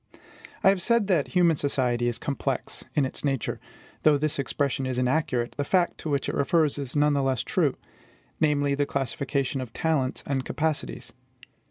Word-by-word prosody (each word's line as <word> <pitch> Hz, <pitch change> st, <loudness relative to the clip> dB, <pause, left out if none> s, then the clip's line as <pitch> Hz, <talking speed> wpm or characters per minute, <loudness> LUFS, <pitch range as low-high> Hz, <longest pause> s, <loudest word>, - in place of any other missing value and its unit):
I -, -, +7 dB
have 195 Hz, -2 st, +2 dB
said 235 Hz, +2 st, +2 dB
that 175 Hz, -8 st, +2 dB
human 170 Hz, -4 st, +3 dB
society 125 Hz, -4 st, 0 dB
is 120 Hz, -, -1 dB
COMPLEX 135 Hz, -2 st, -3 dB
in 145 Hz, -, +3 dB
its 130 Hz, -, -5 dB
nature. 135 Hz, -4 st, -1 dB, 0.4 s
Though 150 Hz, -2 st, +5 dB
this 150 Hz, 0 st, -1 dB
expression 135 Hz, 0 st, -1 dB
is 130 Hz, -1 st, -2 dB
inaccurate, 125 Hz, -2 st, 0 dB
the -, -, +2 dB
fact 175 Hz, +4 st, +1 dB
to 155 Hz, -, -4 dB
which 140 Hz, -1 st, 0 dB
it -, -, -2 dB
refers 150 Hz, 0 st, +2 dB
is 135 Hz, -1 st, -5 dB
none 145 Hz, 0 st, +4 dB
the 140 Hz, -, +2 dB
less 135 Hz, -2 st, 0 dB
true; -, -, +1 dB, 0.6 s
namely, 145 Hz, -2 st, +2 dB
the 140 Hz, 0 st, 0 dB
classification 135 Hz, +1 st, -1 dB
of 125 Hz, -3 st, -7 dB
talents 145 Hz, -6 st, 0 dB
and 135 Hz, -2 st, -1 dB
capacities. 150 Hz, -, -3 dB
140 Hz, 175 wpm, -26 LUFS, 130-155 Hz, 0.6 s, I